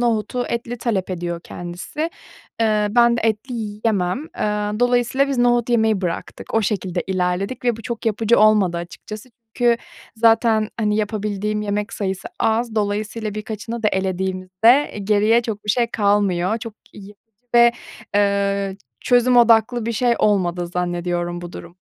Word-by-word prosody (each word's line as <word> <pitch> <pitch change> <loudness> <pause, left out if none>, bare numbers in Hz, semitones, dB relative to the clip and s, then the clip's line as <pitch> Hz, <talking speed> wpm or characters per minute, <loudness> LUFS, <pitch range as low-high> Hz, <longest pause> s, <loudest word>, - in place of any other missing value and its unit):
nohutu 240 +1 0
etli 235 +1 -4
talep 200 -6 -1
ediyor 175 -1 -4
kendisi, 175 - -5 0.5
eee, 215 -2 +2
ben 235 +1 +4
de - - -2
etli 225 +3 -1
yiyemem. 210 -4 -1 0.2
Eee, 210 +1 -1
dolayısıyla 245 +3 +2
biz 275 -2 -1
nohut 240 -1 +3
yemeyi 220 -4 +2
bıraktık, 175 -3 -5
o 225 - +3
şekilde 195 -4 -2
ilerledik 190 +6 -2
ve 240 -2 +2
bu 225 - -11
çok 235 -1 -5
yapıcı 225 +2 +2
olmadı 210 -5 +4
açıkçası. 205 +7 -8 0.3
Çünkü 240 -1 +3 0.4
zaten, 225 -1 +3
hani, 210 -2 +1
yapabildiğim 210 0 -2
yemek 210 +1 -2
sayısı 190 -2 -3
az, 225 +1 +1
dolayısıyla 210 +1 -2
birkaçını 220 +2 -5
da 215 - +4
elediğimizde 190 +6 +1
geriye 215 +3 +3
çok 220 -3 -5
bir 210 - +1
şey 235 +3 +2
kalmıyor. 205 -2 +1
Çok 225 -1 -8 0.2
yapıcı 205 0 -12 0.4
ve, 235 0 +7 0.4
eee, 200 -1 +1 0.2
çözüm 245 0 +3
odaklı 235 0 +4
bir 235 - -1
şey 240 +2 +2
olmadı 180 -4 +1
zannediyorum 175 0 -2
bu 175 0 -8
durum. 170 +1 -10
215 Hz, 145 wpm, -21 LUFS, 195-235 Hz, 0.5 s, ve